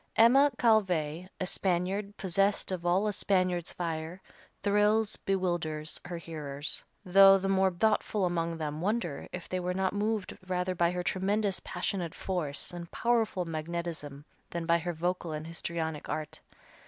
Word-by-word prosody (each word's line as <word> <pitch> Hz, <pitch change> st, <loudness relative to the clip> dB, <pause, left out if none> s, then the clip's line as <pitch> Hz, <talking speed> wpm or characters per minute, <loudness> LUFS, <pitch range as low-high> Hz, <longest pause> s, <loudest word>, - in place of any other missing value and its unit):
Emma 265 Hz, +6 st, +6 dB
Calvé, 180 Hz, -7 st, +2 dB
a 185 Hz, -, -1 dB
Spaniard, 190 Hz, +3 st, -1 dB
possessed 195 Hz, +1 st, +1 dB
of 175 Hz, -2 st, -3 dB
all 185 Hz, +4 st, +3 dB
a 210 Hz, -, 0 dB
Spaniard's 185 Hz, -4 st, +1 dB
fire, 165 Hz, +1 st, -4 dB, 0.4 s
thrills, 210 Hz, +1 st, +3 dB
bewilders, 175 Hz, -5 st, -1 dB
her 175 Hz, -1 st, -5 dB
hearers, 150 Hz, -3 st, -2 dB, 0.2 s
though 195 Hz, +1 st, +8 dB
the 195 Hz, 0 st, -2 dB
more 190 Hz, 0 st, +3 dB
thoughtful 210 Hz, +1 st, +1 dB
among 170 Hz, -1 st, -1 dB
them 155 Hz, -1 st, -4 dB
wonder 195 Hz, -6 st, -2 dB
if 180 Hz, -, -6 dB
they 185 Hz, -, -2 dB
were 180 Hz, 0 st, -2 dB
not 190 Hz, 0 st, 0 dB
moved 210 Hz, -1 st, -1 dB
rather 180 Hz, 0 st, 0 dB
by 170 Hz, -1 st, +2 dB
her 180 Hz, 0 st, -2 dB
tremendous 195 Hz, +2 st, 0 dB
passionate 180 Hz, -2 st, -3 dB
force 165 Hz, -7 st, -1 dB
and 170 Hz, -1 st, -7 dB
powerful 225 Hz, -6 st, +1 dB
magnetism 160 Hz, -3 st, -5 dB, 0.2 s
than 170 Hz, -1 st, -4 dB
by 170 Hz, 0 st, +3 dB
her 175 Hz, +1 st, -3 dB
vocal 175 Hz, 0 st, -2 dB
and 155 Hz, 0 st, -5 dB
histrionic 165 Hz, -2 st, -4 dB
art. 155 Hz, -1 st, -4 dB
180 Hz, 150 wpm, -30 LUFS, 165-195 Hz, 0.4 s, though